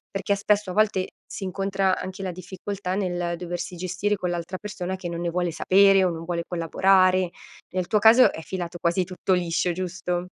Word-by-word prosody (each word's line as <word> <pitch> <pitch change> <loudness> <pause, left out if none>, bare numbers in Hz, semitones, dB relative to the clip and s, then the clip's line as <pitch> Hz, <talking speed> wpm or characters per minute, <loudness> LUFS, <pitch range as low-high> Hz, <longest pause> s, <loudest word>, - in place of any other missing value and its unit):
Perché 200 +1 0
spesso 205 -1 +1
a - - -4
volte 205 -3 +2 0.2
si - - -7
incontra 195 0 0
anche 190 +1 -6
la 185 - -2
difficoltà 185 +1 -5
nel 175 -3 -1
doversi 175 0 -5
gestire 190 +4 -1
con 180 -2 -3
l'altra 175 +1 -4
persona 190 -2 -5
che 180 -2 -6
non 170 - -4
ne 170 0 -1
vuole 175 0 -1
sapere 195 +3 +5
o 180 - +2
non 165 -1 -5
vuole 170 -1 -2
collaborare. 185 +1 +3 0.4
Nel 185 -1 -2
tuo 215 - +2
caso 225 +4 +7
è - - -7
filato 175 0 -5
quasi 170 +2 +1
tutto 185 +1 -1
liscio, 175 0 +1
giusto? 180 0 -3
185 Hz, 190 wpm, -25 LUFS, 175-195 Hz, 0.4 s, caso